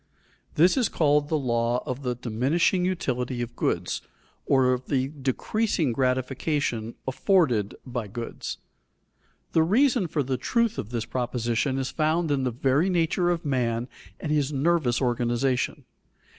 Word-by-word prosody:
_ - - -28
This 175 - +5
is 245 -5 +2
called 145 -2 +2
the 155 - +2
law 120 -2 0
of 130 +2 -4
the 125 -2 -2
diminishing 130 - +1
utility 130 -9 -1
of 120 0 -8
goods - - -1 0.5
or 130 -2 +4
of 125 0 -4
the 135 -2 0
decreasing 150 - -1
gratification 130 -1 -1
afforded 130 - +2
by 120 -4 -4
goods. 115 +3 -6 0.9
The 160 - +4
reason 210 - +3
for 150 -2 -1
the 130 0 -1
truth 230 - 0
of 105 - -5
this 115 -2 -3
proposition 125 +1 -1
is 135 -1 -2
found 160 +1 +1
in 135 -2 +1
the - - +2
very 135 +8 +1
nature 175 0 +1
of 170 -2 -1
man 120 -3 0 0.3
and 150 - -3
his 150 -2 +1
nervous 140 -3 +1
organization. 120 +1 0
135 Hz, 145 wpm, -26 LUFS, 120-160 Hz, 0.9 s, This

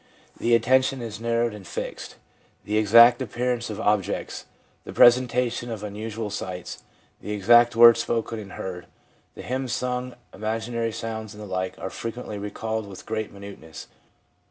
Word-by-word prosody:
The 120 0 +3
atten 125 +3 +4
tion 130 0 -3
is 110 -2 -6
narrowed 115 -1 0
and 100 -4 -11
fixed. - - -6 0.5
The 105 - -2
exact 115 +4 +7
appearance 125 -1 -2
of 105 -1 -6
objects, 105 -2 -1 0.4
the - - -9
presentation 120 0 +4
of 110 -3 -6
unusual 105 +1 -5
sights, 90 -3 -6 0.4
the 105 - -5
exact 120 +4 +5
words 115 0 +8
spoken 115 -1 -2
and 100 -2 -10
heard, 90 -2 -6 0.5
the - - -9
hymns 130 -1 -3
sung, 125 0 -3 0.2
imaginary 115 +2 -2
sounds 110 -2 -6
and 105 - -9
the - - -7
like 95 -1 -3
are 95 - -6
frequently 115 -2 -6
recalled 110 +1 -4
with 95 -2 -11
great 110 -1 -3
minuteness. 100 -6 -10
110 Hz, 155 wpm, -25 LUFS, 105-120 Hz, 0.5 s, words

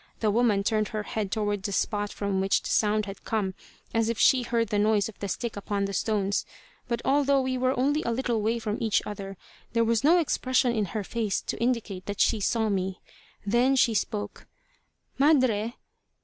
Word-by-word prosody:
The 215 -2 +2
woman 215 -3 +2
turned 215 0 +1
her 215 +1 -4
head 210 -2 -3
toward 205 -2 -1
the 200 - -3
spot 205 +1 -1
from 200 -2 -2
which 195 0 +1
the - - -4
sound 215 0 +2
had 195 0 -9
come, 205 -4 -1 0.4
as 225 -1 +1
if 230 - -1
she 260 +2 +5
heard 235 -2 -1
the 205 - +1
noise 210 -1 +2
of 225 - -12
the 200 - -3
stick 230 +4 -3
upon 200 0 -2
the 195 - -4
stones, 200 0 0 0.4
but 235 -1 -2
although 280 0 +3
we 260 -1 -1
were 255 0 0
only 290 +4 +2
a - - -2
little 235 -2 -1
way 225 +3 +1
from 220 -2 -3
each 220 -3 +1
other, 195 -2 -6 0.4
there 230 0 +3
was 230 0 +1
no 330 +5 +6
expression 260 -6 +1
in 215 -3 0
her 210 - -2
face 220 0 -1
to - - -4
indicate 230 -6 -1
that 205 -1 -4
she 225 - +3
saw 220 +2 +1
me. 190 -2 -2 0.5
Then 240 +6 +3
she 240 -3 +3
spoke. 210 0 -3 0.7
"Madre!" 255 -6 +3
220 Hz, 200 wpm, -27 LUFS, 205-240 Hz, 0.7 s, no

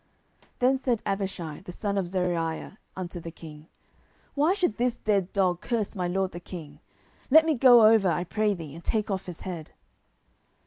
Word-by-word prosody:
10:016:009 - - -29
Then 260 +2 +3
said 245 -4 0
Abishai 195 -6 -3
the 180 - -8
son 200 +2 -3
of 195 -3 0
Zeruiah 175 0 -2 0.2
unto 180 -1 -5
the 165 - -7
king, 155 -2 -12 0.7
Why 305 +6 +2
should 360 - 0
this 245 0 +1
dead 200 -5 0
dog 185 -3 +1
curse 230 -3 -2
my 180 -2 -1
lord 190 +1 -1
the 175 - -7
king? 155 -5 -10 0.5
let 315 +3 +7
me 320 - +2
go 245 -4 +7
over, 215 -3 +5
I 170 +1 0
pray 210 +3 0
thee, 160 -5 -8
and 165 +2 -11
take 215 +2 -1
off 190 -1 -3
his 175 -3 -8
head. 170 -5 -7
190 Hz, 185 wpm, -27 LUFS, 175-220 Hz, 0.7 s, let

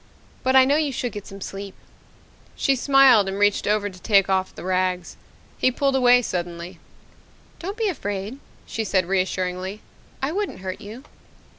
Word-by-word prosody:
But 260 +1 +1
I 260 0 +8
know 280 +3 +3
you 305 -2 0
should 245 -1 -3
get 205 -1 -8
some 195 0 -10
sleep." 195 0 -7 0.8
She 275 - +2
smiled 265 -5 +5
and 195 0 -3
reached 205 0 +2
over 210 0 +1
to 185 -2 -10
take 195 -1 +3
off 190 0 0
the - - -9
rags. 185 -1 -1 0.4
He - - +4
pulled 275 +2 0
away 245 -1 +5
suddenly. 175 -2 -5 0.8
"Don't 390 +5 -5
be 450 -2 0
afraid," 205 - -4 0.3
she 225 - -3
said 190 -3 +1
reassuringly. 185 +1 -2 0.4
"I 270 +3 -1
wouldn't 400 - -3
hurt 185 -1 -5
you." 220 +5 -9
205 Hz, 165 wpm, -23 LUFS, 185-260 Hz, 0.8 s, I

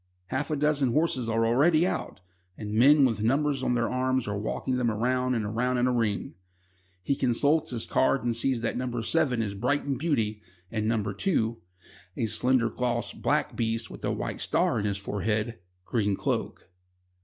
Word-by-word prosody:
Half 140 +4 -2
a 155 - 0
dozen 145 -4 +1
horses 145 -7 +1
are 115 0 +2
already 155 +8 +4
out, 140 - -3 0.4
and 105 -1 -5
men 140 +5 +6
with 115 -5 0
numbers 135 +4 +1
on 125 -1 +1
their 115 -1 +1
arms 130 -1 0
are 105 - -2
walking 110 +5 -2
them 120 -2 +1
round 125 +3 0
and 110 -1 -2
round 125 +2 +1
in 120 - +2
a 125 - +2
ring. 110 -4 -1 0.7
He 140 - +1
consults 140 +4 +1
his 120 -3 -3
card 130 +1 +2
and 120 -1 0
sees 120 0 0
that 115 - -1
No. 120 -1 -2
7 125 -2 +1
is 100 -2 -3
Brighton 135 +6 -1
Beauty, 110 -10 -1 0.3
and 110 -1 -1
No. 110 -2 +1
2 110 - -1 0.6
(a 115 - 0
slender, 120 +1 +2
glossy, 125 +1 -1
black - - 0
beast 115 0 -2
with - - -11
a - - 0
white - - -4
star - - +1
in 105 - -2
his 100 -1 -1
forehead) 105 +3 -2 0.3
Green 105 -3 0
Cloak. 95 - -3
120 Hz, 180 wpm, -27 LUFS, 110-130 Hz, 0.7 s, men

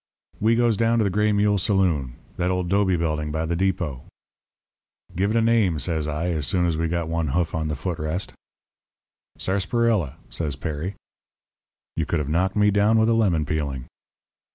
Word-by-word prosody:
"We 110 +2 +3
goes 120 -3 +2
down 115 +1 +2
to 115 - +3
the 100 - 0
Gray 105 +2 +2
Mule 105 0 +2
saloon 90 - +1 0.2
that 90 - 0
old 90 -1 -1
'dobe 95 -2 +2
building 75 -2 -1
by 80 +1 -1
the 85 +1 -1
depot. 90 -7 -1 1.1
"'Give 95 +4 +1
it 110 - +1
a 115 - +3
name,' 110 -8 +3
says 75 +1 -1
I, 75 +3 -2
as 75 -5 -1
soon 90 +7 +1
as 85 -2 +1
we 80 +1 0
got 85 0 -2
one 80 -1 -1
hoof 85 +4 0
on 80 -1 -1
the 75 - -2
foot 85 +2 -4
rest. 80 +5 -3 1.0
"'Sarsaparilla,' 100 - 0 0.2
says 75 -5 -3
Perry. 80 +6 -4 1.0
"You 80 -2 -1
could 85 - 0
have 75 -2 -2
knocked 90 +5 +1
me 105 0 +4
down 105 +2 +3
with 110 +1 +3
a - - +4
lemon 95 -9 +2
peeling. 70 -4 -3
90 Hz, 185 wpm, -24 LUFS, 80-105 Hz, 1.1 s, me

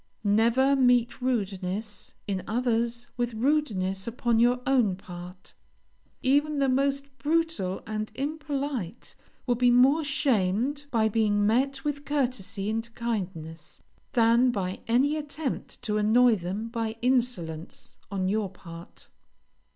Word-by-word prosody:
Never 230 +6 +3
meet 245 -2 +3
rudeness 205 -4 -2
in 195 -2 -1
others 235 0 0
with 240 -1 -1
rudeness 220 -8 0
upon 230 0 +1
your 245 +1 +4
own 245 -8 +3
part; 180 0 -11 0.7
even 290 +3 +2
the 275 -1 +2
most 275 +1 0
brutal 315 - 0
and 215 0 -4
impolite 275 - -4 0.3
will 245 - +2
be 245 +1 +3
more 265 +6 +5
shamed 270 -1 0
by 225 -5 +2
being 210 -1 +2
met 270 +6 +1
with 290 -1 -2
courtesy 255 -9 -2
and 225 +2 -2
kindness, 185 -9 -5 0.3
than 235 +1 +4
by 190 -5 -2
any 270 +6 +3
attempt 295 -1 -5
to 210 -3 0
annoy 230 +3 +5
them 195 +5 -4
by 225 -1 -3
insolence 220 -11 -1
on 190 -2 -1
your 205 0 0
part. 170 -2 -12
235 Hz, 120 wpm, -27 LUFS, 200-270 Hz, 0.7 s, more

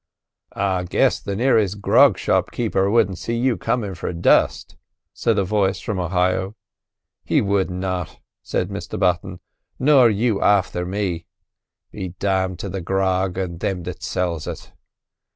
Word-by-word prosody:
"I 95 -2 0
guess - - +2
the 100 - -4
nearest 110 -4 +2
grog 110 +3 +5
shop - - +1
keeper 100 -5 0
wouldn't 100 -4 +2
see 115 0 -3
you 125 0 +1
comin' 115 -4 -2
for 90 - -4
dust," 85 -1 +2 0.4
said 115 -2 0
a 100 - +3
voice 100 0 0
from 105 -4 -3
Ohio. 90 +2 0 0.7
"He - - +2
would 100 -2 +1
not," 90 -2 -4 0.2
said 90 - -2
Mr 100 -4 -6
Button; 90 0 0 0.4
"nor 130 -3 +5
you 110 0 +1
afther 90 -3 +2
me. 90 -4 -3 0.6
Be 95 -3 -6
damned 95 -2 0
to - - -4
the 95 0 -4
grog 95 0 0
and 90 -3 -3
thim 90 -2 -2
that - - -7
sells 85 -4 -2
it!" - - -7
95 Hz, 150 wpm, -21 LUFS, 90-105 Hz, 0.7 s, grog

